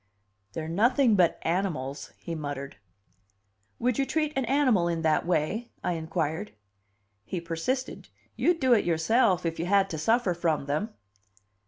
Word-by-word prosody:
"They're 160 -1 -4
nothing 230 - +3
but 180 -4 +3
animals," 155 -6 -2
he 170 - -6
muttered. 145 -3 -5 1.0
"Would 250 +2 0
you 275 - +2
treat 305 -1 0
an 270 -2 0
animal 250 -9 +3
in 165 -1 -2
that 155 +1 +2
way?" 180 +8 0
I - - 0
inquired. 160 +3 -3 0.7
He 180 - -4
persisted. 170 +11 -3 0.3
"You'd 345 -1 +2
do 260 -2 +4
it 220 - +4
yourself 180 +3 +2
if 165 -1 -2
you 170 - -2
had 195 0 +3
to 160 - -4
suffer 225 +2 +2
from 165 -4 -1
them." 155 +10 -2
175 Hz, 150 wpm, -27 LUFS, 160-235 Hz, 1.0 s, do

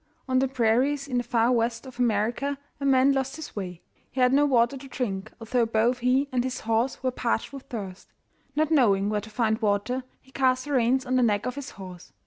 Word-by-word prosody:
On 255 -1 +2
the 270 - +2
prairies 265 +3 +1
in 255 -3 -1
the - - -2
Far 235 0 +2
West 230 0 0
of 255 -1 -12
America 240 +5 0 0.2
a 280 - -3
man 270 0 +5
lost 270 +1 -1
his 315 -1 -9
way. 180 -4 -6 0.3
He 260 - -6
had 250 0 +4
no 290 +1 +5
water 240 -1 +3
to 270 +1 -9
drink, 215 -6 -4
although 235 +1 0
both 230 +3 +1
he 255 +3 +2
and 250 -2 +1
his 255 0 -4
horse 230 +4 0
were 255 - +1
parched 240 0 -2
with 275 -1 -9
thirst. 195 -5 -7 0.4
Not 310 +1 +1
knowing 205 -9 +3
where 210 -1 0
to 220 - -11
find 220 +1 0
water, 220 +5 0 0.2
he 265 - -24
cast 255 -1 +1
the 290 - -6
reins 260 0 +2
on 255 0 +1
the - - +3
neck 210 -4 +2
of 250 - -2
his 285 0 -7
horse. 185 -2 -10
250 Hz, 225 wpm, -26 LUFS, 220-265 Hz, 0.4 s, man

